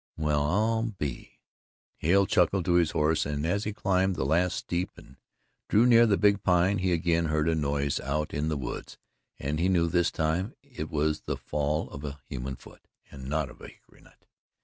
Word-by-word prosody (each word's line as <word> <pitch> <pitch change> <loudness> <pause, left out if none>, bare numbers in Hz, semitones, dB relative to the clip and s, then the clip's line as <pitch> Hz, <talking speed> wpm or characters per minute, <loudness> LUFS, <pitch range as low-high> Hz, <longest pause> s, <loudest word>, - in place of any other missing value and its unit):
"Well, 75 -2 +1
I 110 +9 +1 0.2
be 70 -6 -5 0.3
" - - -58
Hale 95 +5 +3
clucked 90 0 +2
to 90 - +2
his 85 -2 +4
horse 75 +1 +1
and 75 +1 -3
as 100 +5 0
he 105 - -1
climbed 95 -2 +1
the 65 - -2
last 85 +5 +2
steep 90 +1 -2
and 65 - -16 0.5
drew 110 +3 +5
near 120 -1 +6
the 100 -2 +3
Big 100 -1 +3
Pine 90 +1 +2
he 95 0 0
again 85 0 +1
heard 75 0 0
a 85 - +3
noise 70 -2 0
out 75 +3 -2
in 75 +2 -1
the 75 - -1
woods 65 -3 -6 0.4
and 75 +2 -3
he 90 +3 +2
knew 85 -3 +3
this 85 +1 +2
time 85 +8 -1
it 125 - -7
was 75 0 0
the - - -1
fall 75 +2 -2
of 70 - -8
a 75 0 -6
human 65 0 -5
foot - - -16 0.3
and 65 -1 -8
not 75 -2 -1
of - - -17
a - - -9
hickory - - -19
nut. - - -23
80 Hz, 205 wpm, -28 LUFS, 75-95 Hz, 0.5 s, near